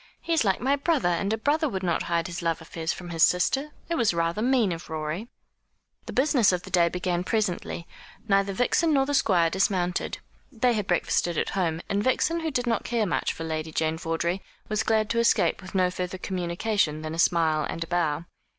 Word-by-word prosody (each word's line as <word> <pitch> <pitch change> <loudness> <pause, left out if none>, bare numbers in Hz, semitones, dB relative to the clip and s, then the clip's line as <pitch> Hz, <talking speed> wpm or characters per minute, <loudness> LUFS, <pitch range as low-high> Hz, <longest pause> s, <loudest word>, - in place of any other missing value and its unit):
"He 335 - -2
is 320 - +3
like 195 -3 +1
my 270 +3 +2
brother; 285 - +1
and 185 +4 0
a 220 - +1
brother 295 +6 +1
would 190 -4 -4
not 170 -2 +1
hide 170 -1 +1
his 175 +1 -5
love 165 -1 0
affairs 160 0 -4
from 175 -1 -7
his 165 -1 -3
sister. 270 - +3 0.2
It 340 - -2
was 230 - +2
rather 170 +4 0
mean 245 -5 +2
of 170 0 -6
Rorie." 160 +7 -4 0.8
The - - -4
business 260 -6 +4
of 180 -1 -2
the 190 - -10
day 175 -2 +4
began 180 0 -1
presently. 185 -4 -2 0.4
Neither 195 -1 +2
Vixen 275 - +2
nor 270 -1 +3
the 285 - -2
Squire 175 -11 +3
dismounted. 185 -2 0 0.3
They 245 -1 +2
had 210 -4 -2
breakfasted 175 -1 +1
at - - 0
home; 170 -4 -1
and 200 +1 0
Vixen, 315 +7 +1
who 325 -1 -2
did 250 -4 -1
not 230 -3 0
care 230 -2 0
much 185 - 0
for 165 - -7
Lady 160 0 -3
Jane 160 +1 -1
Vawdrey, 170 +3 -1 0.3
was 215 -1 +1
glad 220 -1 +1
to 230 - +1
escape 235 -3 +2
with 190 +1 -11
no 180 -1 +3
further 180 +1 -4
communication 180 -3 -1
than 155 0 -4
a 165 - -5
smile 160 -3 +3
and 165 - -3
a - - -10
bow. 170 -2 0
185 Hz, 215 wpm, -26 LUFS, 170-225 Hz, 0.8 s, business